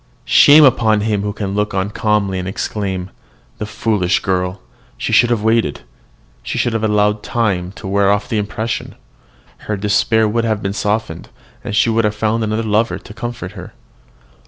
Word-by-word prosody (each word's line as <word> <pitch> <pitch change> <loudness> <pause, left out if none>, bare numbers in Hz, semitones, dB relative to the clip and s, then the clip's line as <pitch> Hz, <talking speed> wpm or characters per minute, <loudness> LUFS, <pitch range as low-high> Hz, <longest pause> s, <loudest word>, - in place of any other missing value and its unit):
"Shame 145 +4 +7
upon 110 -5 +4
him 105 -1 0
who 105 0 -2
can 100 -2 -4
look 105 0 -1
on 95 +2 -1
calmly, 105 -3 0
and 90 - -4
exclaim, 95 -1 -3 0.5
'The 105 - -4
foolish 105 -5 0
girl! 90 0 -1 0.4
she - - -3
should 120 - +5
have 115 -3 0
waited; 110 -9 +1 0.6
she - - -4
should 120 - 0
have 115 -1 -1
allowed 105 -1 +2
time 95 -6 -1
to 100 - -9
wear 100 0 +2
off 105 0 0
the 110 - -1
impression; 110 +2 -4 0.7
her 105 - 0
despair 110 +2 +2
would 115 +2 0
have 110 -2 -1
been 100 0 -2
softened, 105 -5 -2 0.3
and 120 -4 -4
she 115 - +3
would 115 +1 +2
have 105 0 0
found 110 +1 0
another 110 +1 -1
lover 110 +1 +1
to - - -12
comfort 115 -5 -6
her.' 90 -3 -10
105 Hz, 180 wpm, -17 LUFS, 100-110 Hz, 0.7 s, Shame